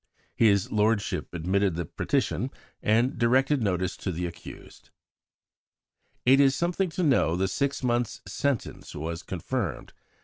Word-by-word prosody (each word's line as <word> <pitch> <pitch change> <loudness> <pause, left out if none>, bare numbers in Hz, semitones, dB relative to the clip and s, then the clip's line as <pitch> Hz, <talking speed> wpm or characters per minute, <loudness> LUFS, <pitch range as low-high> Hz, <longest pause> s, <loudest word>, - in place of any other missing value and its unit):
His 100 -4 +3
lordship 105 0 0
admitted 90 +2 0
the 85 0 -2
petition, - - -1 0.3
and 115 +4 +2
directed 130 +4 +3
notice 95 -3 0
to 95 - -3
the 90 +1 -3
accused." 85 0 -10 1.4
It 135 +2 +6
is 135 -1 +5
something 175 +2 0
to 180 - +1
know 125 - +3
the 95 +2 +1
six 140 +8 -1
months' 120 -2 0
sentence 120 +6 -3
was 80 +3 -4
confirmed. 90 -4 -4
105 Hz, 130 wpm, -27 LUFS, 90-135 Hz, 1.4 s, It